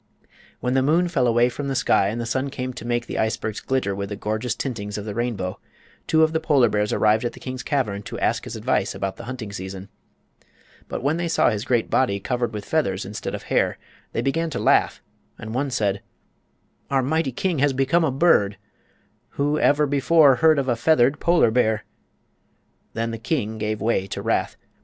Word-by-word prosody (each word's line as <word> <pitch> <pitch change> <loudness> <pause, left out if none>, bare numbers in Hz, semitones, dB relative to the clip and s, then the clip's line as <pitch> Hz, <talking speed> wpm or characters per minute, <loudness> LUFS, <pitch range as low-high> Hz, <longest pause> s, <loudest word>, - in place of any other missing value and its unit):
When 125 - 0
the 135 - +3
moon 165 +6 +2
fell 130 -7 +1
away 120 +1 +4
from 140 +3 -4
the 135 - -2
sky 100 - +3
and 110 +4 -3
the 120 - -3
sun 130 +4 -1
came 130 -1 -5
to 120 -1 -8
make 120 0 0
the - - -4
icebergs 110 -1 -1
glitter 130 -7 -1
with 100 0 -4
the 105 - -4
gorgeous 110 +4 -2
tintings 105 -6 -4
of 105 - -5
the 105 - -4
rainbow, 110 -5 -3 0.5
two 160 0 +4
of 160 0 +2
the 160 - +1
polar 140 -7 +3
bears 105 0 0
arrived 110 +1 +3
at 120 - -2
the - - -12
king's 130 -1 -6
cavern 115 -10 -1
to - - -7
ask - - 0
his - - -6
advice - - -1
about 95 -1 -3
the - - -9
hunting 120 -4 -6
season. 95 0 -7 1.0
But - - -5
when 145 +4 +1
they 175 0 -1
saw 165 - +3
his 105 0 -3
great 120 -3 0
body 100 -7 +2
covered 120 +2 -2
with 105 -2 -6
feathers 100 -12 0
instead 105 +2 -5
of - - -8
hair - - 0 0.3
they - - -2
began 165 +5 0
to - - -4
laugh, - - +2 0.3
and 110 0 -7
one 140 +3 -1
said: 100 -5 -1 0.9
"Our 135 -1 +2
mighty 155 +1 0
king 170 +5 -1
has 145 +1 +3
become 135 +6 +2
a 160 - +2
bird! 130 - +3 0.8
Who 145 +2 +1
ever 150 +1 +3
before 145 0 +4
heard 160 -1 +5
of 135 -1 0
a 120 - +2
feathered 130 +1 +3
polar 170 -9 +3
bear?" 110 -3 +1 1.1
Then 115 +1 -2
the 115 - -5
king 110 -3 -2
gave 110 -1 -2
way 105 -3 0
to - - -5
wrath. - - 0
125 Hz, 205 wpm, -23 LUFS, 105-140 Hz, 1.1 s, heard